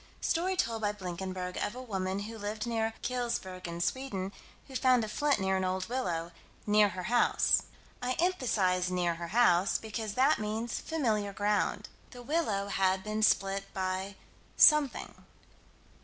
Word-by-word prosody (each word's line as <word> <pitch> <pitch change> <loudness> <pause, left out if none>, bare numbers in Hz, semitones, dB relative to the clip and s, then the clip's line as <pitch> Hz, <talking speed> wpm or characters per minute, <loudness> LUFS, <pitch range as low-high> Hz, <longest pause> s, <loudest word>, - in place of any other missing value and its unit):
Story 370 +3 0
told 230 -10 -1
by 205 -1 0
Blinkenberg, 185 -1 -5
of 205 - -2
a 255 - -6
woman, 190 -4 -2
who 220 +2 -6
lived 210 +1 -4
near 225 -1 -1
Kulsbjaergene, 185 -8 -3
Sweden, 200 -8 -2 0.4
who 265 - -11
found 255 -2 +4
a - - -3
flint 290 +6 +1
near 190 0 +1
an 190 - -1
old 185 0 -1
willow 175 -10 -2 0.3
"near 210 0 +5
her 185 -1 -6
house." 240 0 +3 0.4
I 250 +1 0
emphasize 220 - +1
"near 180 -2 0
her 170 +1 -6
house" 195 -3 +3
because 220 -1 -5
that 275 +4 +4
means 220 +2 -3
familiar 220 -10 -1
ground. 205 +1 0 0.2
The 245 -1 -11
willow 225 -10 -1
had 190 -1 +1
been 215 +1 -2
split 195 -2 +2
by 190 +1 -2 0.4
something. 300 -4 +4
210 Hz, 150 wpm, -31 LUFS, 185-245 Hz, 0.4 s, near